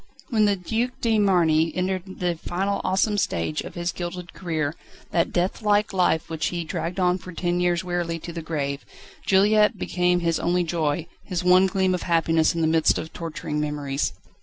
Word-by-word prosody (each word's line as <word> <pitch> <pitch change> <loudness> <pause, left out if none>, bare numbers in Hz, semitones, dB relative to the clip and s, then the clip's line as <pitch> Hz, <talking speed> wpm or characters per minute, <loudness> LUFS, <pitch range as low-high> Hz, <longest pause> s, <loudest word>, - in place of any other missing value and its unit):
When 215 -2 +4
the 205 -1 +3
Duc 225 +7 -2
de 225 -2 +2
Marny 165 -5 +3
entered 185 0 -2
the 175 -1 +1
final 190 +5 -2
awesome 205 +2 +1
stage 80 - -1
of - - -9
his 175 0 -2
gilded 175 0 -6
career, 160 -5 -2 0.4
that 170 +1 +1
deathlike 205 +3 +1
life 180 -4 +2
which 160 -2 -2
he 175 -1 -2
dragged 170 +3 -4
on 180 0 +2
for 185 - -10
ten 175 +1 -1
years 175 -1 +1
wearily 175 -2 -2
to 170 - -7
the 165 - -5
grave, 145 -3 -3 0.4
Juliette 210 +2 +4
became 180 -1 +1
his 165 -1 +1
only 175 +1 +1
joy, 160 -1 -1 0.2
his 180 -3 -2
one 185 +1 +6
gleam 190 0 +1
of 180 - -2
happiness 165 -1 +2
in 165 - -1
the - - +3
midst 160 0 +3
of 160 - -6
torturing 155 -2 -4
memories. 145 - -1
175 Hz, 185 wpm, -24 LUFS, 165-190 Hz, 0.4 s, one